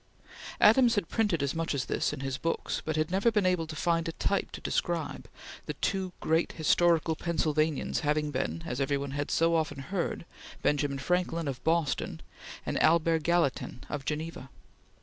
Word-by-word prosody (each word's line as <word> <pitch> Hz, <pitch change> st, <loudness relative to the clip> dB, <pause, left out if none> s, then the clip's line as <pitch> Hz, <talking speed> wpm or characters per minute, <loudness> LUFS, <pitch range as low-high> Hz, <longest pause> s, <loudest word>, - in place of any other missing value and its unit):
Adams 235 Hz, +2 st, +6 dB
had 200 Hz, -6 st, -1 dB
printed 205 Hz, -10 st, +1 dB
as 140 Hz, -, 0 dB
much 165 Hz, -2 st, -1 dB
as 130 Hz, -, -1 dB
this -, -, 0 dB
in -, -, -6 dB
his 135 Hz, -1 st, -3 dB
books, 165 Hz, -, -2 dB
but 155 Hz, -, -2 dB
had 155 Hz, +1 st, 0 dB
never 195 Hz, +5 st, +3 dB
been 210 Hz, -4 st, +1 dB
able 180 Hz, -3 st, +1 dB
to 155 Hz, -, -7 dB
find 165 Hz, +2 st, +1 dB
a -, -, -5 dB
type 200 Hz, -, -1 dB
to -, -, -7 dB
describe, 170 Hz, -3 st, -2 dB, 0.4 s
the -, -, -3 dB
two 190 Hz, -2 st, -1 dB
great 160 Hz, +1 st, +1 dB
historical 165 Hz, 0 st, +3 dB
Pennsylvanians 155 Hz, -3 st, 0 dB
having 150 Hz, 0 st, 0 dB
been, 85 Hz, -, -2 dB
as 125 Hz, +3 st, -3 dB
every 140 Hz, +1 st, +1 dB
one 140 Hz, 0 st, -4 dB
had 145 Hz, +1 st, -3 dB
so 165 Hz, +1 st, +3 dB
often 160 Hz, -3 st, 0 dB
heard, 170 Hz, +5 st, -3 dB, 0.4 s
Benjamin 145 Hz, -1 st, +1 dB
Franklin 170 Hz, +2 st, 0 dB
of 130 Hz, -3 st, -4 dB
Boston 160 Hz, -3 st, 0 dB, 0.5 s
and -, -, -1 dB
Albert 165 Hz, 0 st, +4 dB
Gallatin 160 Hz, -7 st, 0 dB
of 145 Hz, -2 st, -4 dB
Geneva. 155 Hz, -2 st, -4 dB
160 Hz, 175 wpm, -29 LUFS, 145-170 Hz, 0.5 s, Adams